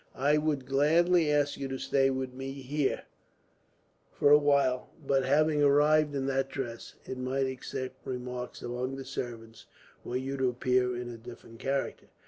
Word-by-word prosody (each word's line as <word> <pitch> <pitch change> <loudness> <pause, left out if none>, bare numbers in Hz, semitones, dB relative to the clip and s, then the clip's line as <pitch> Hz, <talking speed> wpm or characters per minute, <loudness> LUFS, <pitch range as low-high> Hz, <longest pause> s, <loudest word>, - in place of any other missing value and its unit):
"I 145 +3 +3
would 150 -4 -1
gladly 160 +4 +3
ask 145 -1 +1
you 140 - -3
to 135 0 -4
stay 135 0 +2
with 130 -1 -3
me 135 +1 -6
here, 140 +1 -2 1.1
for 145 - +3
a 150 - +10
while; 140 -3 +2 0.2
but 135 -1 +2
having 155 +2 +3
arrived 145 +1 +4
in 135 -1 -1
that 135 0 0
dress, 120 -4 -6
it 130 - -6
might 130 +1 0
excite 130 0 -5
remark 125 -1 -5
among 125 +2 -3
the 135 0 -7
servants 115 -4 -7 0.4
were 125 - -3
you 135 +1 -3
to 130 -1 +2
appear 125 0 +1
in 120 0 -5
a 115 - -8
different 115 -1 -12
character. 135 0 -2
135 Hz, 165 wpm, -30 LUFS, 125-145 Hz, 1.1 s, a